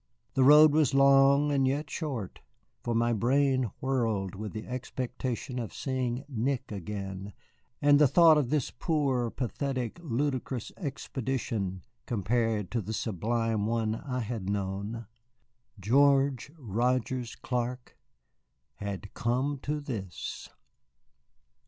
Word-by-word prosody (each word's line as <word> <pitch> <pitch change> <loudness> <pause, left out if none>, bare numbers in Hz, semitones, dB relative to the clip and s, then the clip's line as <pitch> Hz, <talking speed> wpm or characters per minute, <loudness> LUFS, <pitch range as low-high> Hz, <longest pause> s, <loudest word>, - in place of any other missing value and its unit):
The 130 - +3
road 150 +3 +8
was 150 -3 +3
long, 140 +1 +5
and 135 -2 +2
yet 145 +3 -1
short, 130 - -4 0.4
for 120 -1 -2
my 120 +1 +2
brain 130 +2 +2
whirled 115 -8 0
with 105 +1 -6
the 110 -1 -6
expectation 125 +1 -4
of 115 -4 -5
seeing 130 -1 -2
Nick 130 -1 -2
again, 100 0 -5 0.5
and 145 0 +6
the 150 - +7
thought 165 +3 +7
of 145 -5 +1
this 150 -3 0
poor, 135 -5 0
pathetic, 130 +2 -3
ludicrous 130 -4 -2
expedition 120 - -3 0.2
compared 110 -1 0
to 120 - 0
the 110 +2 -5
sublime 110 +1 -1
one 110 -1 0
I 125 +2 -4
had 110 -4 -4
known. 100 +3 -3 0.7
George 135 +5 +3
Rogers 125 0 -1
Clark 125 0 -3 0.8
had 100 0 -6
come 130 +4 -1
to 150 +3 -2
this! 110 -11 -6
125 Hz, 115 wpm, -29 LUFS, 110-140 Hz, 0.8 s, road